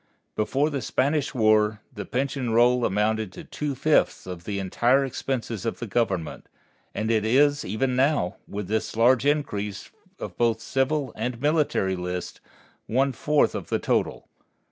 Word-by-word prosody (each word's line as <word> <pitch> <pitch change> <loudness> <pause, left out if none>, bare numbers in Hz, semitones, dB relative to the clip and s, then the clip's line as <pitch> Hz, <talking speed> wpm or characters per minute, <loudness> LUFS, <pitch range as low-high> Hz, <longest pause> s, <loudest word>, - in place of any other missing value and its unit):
Before 135 +8 +1
the 140 -2 -2
Spanish 145 +2 0
War 110 -2 +3
the - - -6
pension 130 -1 -2
roll 120 +1 +4
amounted 105 0 0
to - - -9
two 150 -2 -4
fifths - - +2
of 90 -2 -8
the 100 -1 -3
entire 120 +8 +2
expenses 120 -5 -3
of 115 - -2
the 120 - -5
Government, 95 -7 -2 0.5
and 110 +1 -1
it 110 -2 +2
is 145 +6 +3
even 125 +7 -1
now, 135 - +1
with 100 -2 -5
the 110 +2 0
large 125 +3 +4
increase 105 -9 -2 0.3
of - - -7
both 115 -1 +3
the - - -14
civil 135 0 0
and 120 +2 -3
military 145 -10 +1
list, 90 0 -5 0.5
one 135 +4 +2
fourth 150 +4 +2
of - - -6
the - - +1
total. - - -1
120 Hz, 160 wpm, -25 LUFS, 105-135 Hz, 0.5 s, roll